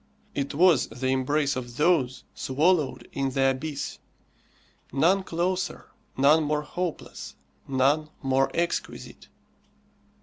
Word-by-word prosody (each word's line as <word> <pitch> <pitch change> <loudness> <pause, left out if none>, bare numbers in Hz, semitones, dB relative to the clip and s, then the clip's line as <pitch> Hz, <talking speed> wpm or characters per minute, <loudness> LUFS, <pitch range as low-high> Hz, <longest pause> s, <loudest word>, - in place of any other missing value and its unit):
It 140 0 -3
was 170 -3 +5
the 130 +1 -3
embrace 140 +2 +1
of 120 -2 -6
those 150 -6 +2
swallowed 150 +2 +1
in 135 -1 -1
the 135 0 +2
abyss; 140 +2 -5 0.9
none 170 +9 +3
closer, 185 +1 -2 0.3
none 145 +4 +5
more 150 0 0
hopeless, 175 +2 -5 0.3
none 140 +4 +2
more 135 0 +2
exquisite. 170 0 -3
145 Hz, 105 wpm, -26 LUFS, 135-165 Hz, 0.9 s, was